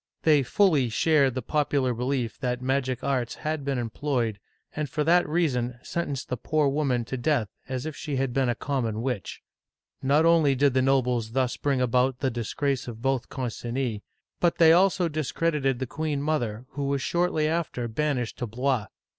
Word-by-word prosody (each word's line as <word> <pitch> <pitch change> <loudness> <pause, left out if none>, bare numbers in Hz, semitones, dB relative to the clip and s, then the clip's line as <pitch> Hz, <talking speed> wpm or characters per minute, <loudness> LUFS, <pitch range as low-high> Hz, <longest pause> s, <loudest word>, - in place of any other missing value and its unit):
They 150 -3 +5
fully 145 - +3
shared 135 +4 +3
the 130 - -3
popular 145 -4 +1
belief 125 0 -2
that 125 -2 -1
magic 130 -1 -1
arts 130 -4 -1
had 155 -1 -3
been 135 -1 -1
employed, 120 -2 -2 0.4
and 150 -2 -2
for 150 +3 -1
that 170 0 +3
reason 125 -7 0
sentenced 145 -6 -3
the 125 - -2
poor 155 +5 +1
woman 135 -5 0
to 130 - -4
death 120 -4 +1 0.2
as 130 0 -3
if 155 -2 -5
she 145 - -4
had 135 -2 -1
been 135 -1 +1
a 120 - 0
common 115 -5 -2
witch. 125 -8 -4 0.6
Not 145 +4 +3
only 160 -5 +4
did 140 0 +3
the 130 - +3
nobles 125 -4 +1
thus 130 -1 +1
bring 140 -3 0
about 125 +1 +2
the 130 0 -1
disgrace 125 +4 -2
of 115 -1 -8
both 135 -2 0
Concinis, 120 -2 -3 0.4
but 175 -1 +2
they 165 -1 +7
also 185 0 +3
discredited 150 -3 0
the 130 - -2
queen 150 +2 -2
mother, 125 -6 -1
who 140 -1 -4
was 140 -1 -1
shortly 170 -3 +1
after 155 -7 -2
banished 125 0 -2
to 120 - -2
Blois. 125 0 -1
135 Hz, 180 wpm, -26 LUFS, 125-150 Hz, 0.6 s, they